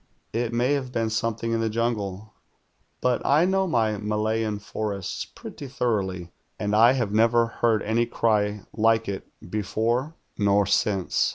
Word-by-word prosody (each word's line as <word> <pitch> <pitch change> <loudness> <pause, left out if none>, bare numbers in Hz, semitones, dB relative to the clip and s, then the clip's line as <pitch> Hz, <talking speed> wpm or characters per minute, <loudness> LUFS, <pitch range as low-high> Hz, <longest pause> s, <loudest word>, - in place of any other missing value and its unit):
It 115 +1 -1
may 120 +4 +2
have 135 -3 -2
been 115 -2 -1
something 115 +1 -1
in 115 - +1
the 115 0 0
jungle, 105 -3 -2 0.7
but 125 -1 +1
I 150 +5 +4
know 190 0 +1
my 110 - +1
Malayan 110 +1 -1
forests 100 -2 -4
pretty 140 - -9
thoroughly, 95 -9 -2 0.3
and 105 0 -1
I 115 +4 +7
have 120 -6 -1
never 115 +2 +4
heard 115 -1 +1
any 115 +2 +1
cry 105 -3 +1
like 115 0 +2
it 100 -1 -4 0.2
before 115 - -1 0.2
nor 100 0 +3
since. 100 -1 +1
110 Hz, 150 wpm, -25 LUFS, 105-120 Hz, 0.7 s, I